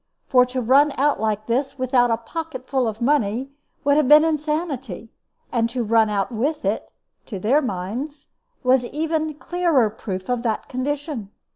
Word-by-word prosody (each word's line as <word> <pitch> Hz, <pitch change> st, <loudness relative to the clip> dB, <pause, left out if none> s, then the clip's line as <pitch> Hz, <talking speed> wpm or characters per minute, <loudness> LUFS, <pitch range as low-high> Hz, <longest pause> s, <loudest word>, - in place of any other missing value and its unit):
For 250 Hz, -2 st, +4 dB
to 255 Hz, 0 st, -3 dB
run 275 Hz, +5 st, +4 dB
out 285 Hz, -1 st, +2 dB
like 215 Hz, 0 st, -1 dB
this, 265 Hz, +4 st, -1 dB
without 255 Hz, -1 st, +2 dB
a 230 Hz, -, +2 dB
pocket 265 Hz, +1 st, -6 dB
full 260 Hz, -3 st, +1 dB
of 220 Hz, 0 st, -5 dB
money, 260 Hz, -1 st, +1 dB, 0.3 s
would 285 Hz, 0 st, +3 dB
have 305 Hz, -4 st, +3 dB
been 300 Hz, +2 st, +8 dB
insanity; 300 Hz, -, -2 dB, 0.4 s
and 230 Hz, -1 st, +1 dB
to 245 Hz, 0 st, -2 dB
run 225 Hz, 0 st, +3 dB
out 200 Hz, +2 st, -1 dB
with 285 Hz, +7 st, -2 dB
it, -, -, -2 dB, 0.4 s
to 210 Hz, -, -5 dB
their 240 Hz, +11 st, +2 dB
minds, 250 Hz, +7 st, -5 dB, 0.4 s
was 255 Hz, 0 st, +4 dB
even 310 Hz, +2 st, -2 dB
clearer 315 Hz, -9 st, +1 dB
proof 185 Hz, -3 st, -6 dB
of 245 Hz, -1 st, 0 dB
that 225 Hz, -3 st, -2 dB
condition. 275 Hz, -3 st, -3 dB
255 Hz, 165 wpm, -22 LUFS, 225-295 Hz, 0.4 s, been